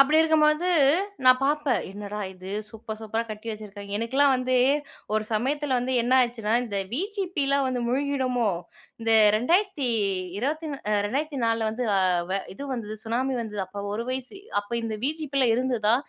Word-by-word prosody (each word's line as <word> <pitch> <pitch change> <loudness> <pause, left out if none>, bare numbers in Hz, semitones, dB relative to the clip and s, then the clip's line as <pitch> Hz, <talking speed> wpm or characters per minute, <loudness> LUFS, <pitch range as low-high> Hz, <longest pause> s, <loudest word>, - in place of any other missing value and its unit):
அப்டி 300 +3 +6
இருக்கும்பொழுது, 315 +2 +3 0.6
நான் 255 0 +7
பாப்பேன் 295 -1 +1
என்னடா 205 +1 -6
இது? 185 0 -10 0.2
சூப்பர் 220 0 -8
சூப்பரா 220 +1 -2
கட்டி 215 +1 -8
வச்சிருக்காய்ங்க. 205 -1 -6
எனுக்கலாம் 270 +5 +3
வந்து, 255 0 +1 0.6
ஒரு 215 0 +2
சமயத்துல 265 +5 0
வந்து 255 +1 -2
என்னாச்சுனா, 240 -3 +2
இந்த 205 -4 -4 0.2
விஜிபிலா 350 - 0
வந்து 255 -1 -1
மூழ்கிடுமோ? 255 -3 0 0.5
இந்த 225 0 -1 0.3
2020- 245 - 0
த்தி - - -4
நா - - -8
அ 205 - +3
2004- 255 -3 -1
ல 220 - +1
வந்து 245 +3 -3
அ - - +4 0.6
இது 280 - -8
வந்துது 215 -3 -4
சுனாமி 255 +4 0
வந்துது, 210 -3 -4
அப்போ 200 +2 -7
1 230 +2 -3
வயசு. 260 +8 -5 0.2
"அப்போ 205 +3 -13
இந்த 220 -1 -3
வி.ஜி.பி 295 -1 -2
லாம் 235 -2 +4
இருந்துதா? 240 -4 +2
245 Hz, 155 wpm, -26 LUFS, 215-280 Hz, 0.6 s, நான்